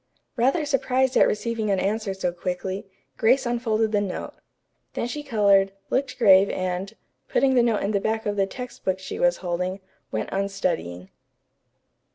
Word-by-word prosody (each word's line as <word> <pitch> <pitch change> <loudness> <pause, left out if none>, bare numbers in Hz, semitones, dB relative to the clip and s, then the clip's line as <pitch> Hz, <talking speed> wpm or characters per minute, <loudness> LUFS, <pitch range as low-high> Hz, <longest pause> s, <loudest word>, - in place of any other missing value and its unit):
Rather 270 +6 +2
surprised 265 -2 +1
at - - +6
receiving 220 0 -2
an 195 -2 +2
answer 210 +2 -1
so 180 -2 -1
quickly, 185 +2 -4 0.3
Grace 250 +5 +3
unfolded 225 -2 0
the 205 -1 +2
note. 195 -3 -4 0.6
Then - - -1
she 295 +4 -4
colored, 200 -7 +3 0.2
looked 275 +1 -1
grave 195 -4 +6
and, 185 +1 -3 0.4
putting 270 -1 +2
the 250 - +5
note 230 -3 +1
in 200 - 0
the 200 - +1
back 220 +2 -1
of 205 -1 -1
the 195 -1 +1
text 250 +5 -8
book 190 -1 0
she 190 - -7
was 175 0 +3
holding, 180 +2 -2 0.3
went 110 -1 -3
on 195 +1 0
studying. 90 - -3
205 Hz, 170 wpm, -24 LUFS, 190-235 Hz, 0.6 s, at